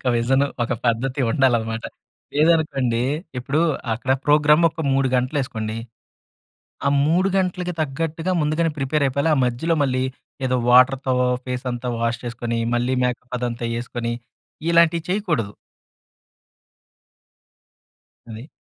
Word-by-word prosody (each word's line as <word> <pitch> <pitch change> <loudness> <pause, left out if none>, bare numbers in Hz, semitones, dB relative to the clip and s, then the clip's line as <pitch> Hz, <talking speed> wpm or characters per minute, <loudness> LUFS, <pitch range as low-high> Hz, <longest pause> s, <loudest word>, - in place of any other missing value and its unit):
ఒక 125 - 0
విజన్, 130 +4 +2 0.2
ఒక 120 - -1
పద్ధతి 125 +4 0
ఉండాలనమాట. 115 -3 +1 0.5
లేదనుకోండి, 145 -6 +2 0.4
ఇప్పుడు 140 +5 -1 0.3
అక్కడ 125 +3 -1
ప్రోగ్రామ్ 150 +2 +5
ఒక 160 0 -6
3 135 -1 +2
గంటలు 130 +4 0
ఏసుకోండి. 110 -3 -4 1.1
ఆ - - +4 0.2
3 180 +5 +2
గంటలకి 180 -1 -1
తగ్గట్టుగా 160 +4 -2
ముందుగానే 155 +2 +1
ప్రిపేర్ 140 +2 0
అయిపోవాలి. 140 +5 0
ఆ - - 0
మధ్యలో 125 +8 0
మళ్ళీ, 130 -1 0 0.4
ఏదో 125 0 +1
వాటర్‌తో 130 +1 +5 0.3
ఫేస్ 125 0 -4
అంతా 120 +1 -4
వాష్ 115 0 -1
చేసుకొని, 115 0 -3 0.2
మళ్ళీ 120 +2 0
మేకప్ 125 0 -3
అదంతా 120 -1 -3
వేసుకొని, 120 0 -3 0.6
ఇలాంటివి 170 -1 +4
చేయకూడదు. 165 - -1 2.8
అది. 115 +6 -9
130 Hz, 115 wpm, -22 LUFS, 120-155 Hz, 2.8 s, ప్రోగ్రామ్